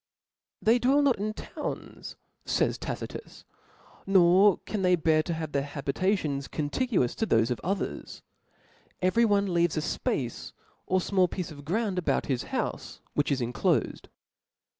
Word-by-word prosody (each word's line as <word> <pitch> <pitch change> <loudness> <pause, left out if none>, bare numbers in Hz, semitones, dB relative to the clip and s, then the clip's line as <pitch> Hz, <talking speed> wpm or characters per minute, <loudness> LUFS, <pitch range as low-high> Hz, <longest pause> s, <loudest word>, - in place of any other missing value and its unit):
." - - -65
They 230 +3 +4
dwell 275 +4 +3
not 265 -7 +2
in 215 +1 -2
townSj - - -7 0.3
fays - - 0
* - - -32
Tacrtus, - - -7 0.6
nor 190 +1 +5
^ - - -37
can 210 - -3
they 180 -1 +4
bear 160 -2 +3
to 170 - -3
have 160 -2 -5
their 140 - +1
habitatbns 145 +1 -1
contiguous 155 - 0
*^ - - -30
to 225 - +1
thofe 115 - +3
of 120 - -2
others; 195 +4 -4 0.8
every 205 +6 +3
one 200 -3 +2
leaves 170 -2 +2
a - - +1
fpace 125 -5 -3 0.3
or 185 - +2
*^ - - -5
fmall 185 -2 +4
piece 180 -3 -5
of 145 - -10
gr6und 195 +2 0
about 180 - 0
his 130 -4 -2
houfc, - - -4 0.2
which 145 0 0
is 135 -2 +1
*^ 120 +1 -2
inclofed." 110 - 0
175 Hz, 170 wpm, -28 LUFS, 145-200 Hz, 0.8 s, nor